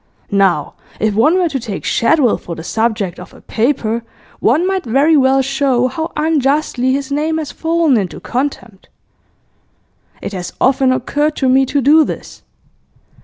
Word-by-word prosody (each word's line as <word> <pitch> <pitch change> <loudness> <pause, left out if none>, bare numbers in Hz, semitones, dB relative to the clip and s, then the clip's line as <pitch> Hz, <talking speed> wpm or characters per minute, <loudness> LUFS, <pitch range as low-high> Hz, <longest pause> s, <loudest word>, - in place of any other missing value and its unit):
Now, 190 -7 +2 0.3
if 215 -1 +1
one 285 - +3
were 360 -2 +1
to 270 -3 -3
take 220 -5 -6
Shadwell 245 0 +2
for 170 - -7
the 160 - -8
subject 215 -3 -2
of - - -12
a - - -16
paper, 230 -1 -1 0.4
one 300 +10 +2
might 380 0 -1
very 275 +7 +3
well 270 -1 +3
show 270 -2 +1
how 320 +6 -4
unjustly 290 -4 +1
his 275 +1 -2
name 310 +3 0
has 310 -3 -4
fallen 330 -4 +1
into 190 -4 -3
contempt. 245 -6 -5 1.3
It - - -6
has 180 -2 -6
often 265 0 +3
occurred 295 +4 -1
to 265 - 0
me 265 +1 +3
to 285 +2 0
do 305 +4 +5
this. - - -7
270 Hz, 160 wpm, -16 LUFS, 230-300 Hz, 1.3 s, do